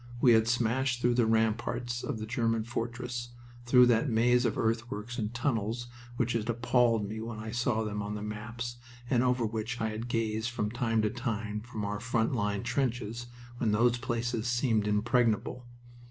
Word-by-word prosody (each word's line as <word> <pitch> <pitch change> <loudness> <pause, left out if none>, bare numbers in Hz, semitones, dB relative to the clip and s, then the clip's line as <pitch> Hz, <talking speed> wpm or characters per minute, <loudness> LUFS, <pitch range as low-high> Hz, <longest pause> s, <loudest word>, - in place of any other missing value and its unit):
We 120 -1 +6
had 110 0 +4
smashed 120 +2 +1
through 120 0 +3
the 120 -2 +3
ramparts 120 +2 0
of 145 - -3
the 110 - -5
German 115 -1 0
fortress, 120 +1 -4 0.4
through 125 0 +7
that 120 +3 +3
maze 120 +2 +3
of 110 - 0
earthworks 115 0 -2
and 105 -1 -2
tunnels 120 -1 -1 0.3
which 120 0 +1
had 115 0 -1
appalled 120 -2 +2
me 110 +2 -5
when 115 -1 -5
I 110 0 -5
saw 120 -1 0
them 105 -1 -3
on 105 +1 -4
the 105 - -5
maps, 115 +3 -5 0.3
and 120 -3 +4
over 125 -1 +2
which 110 +2 -3
I 110 -1 0
had 110 +2 -5
gazed 115 -1 -1
from 105 -3 -2
time 115 -2 +1
to 105 - +1
time 110 -4 -3
from 110 -2 -5
our 105 +1 -2
front 120 0 0
line 105 -3 -1
trenches 120 -2 -2 0.3
when 110 - +1
those 120 +3 +3
places 120 -2 -2
seemed 120 -3 +1
impregnable. 115 +2 +1
115 Hz, 180 wpm, -30 LUFS, 110-120 Hz, 0.4 s, through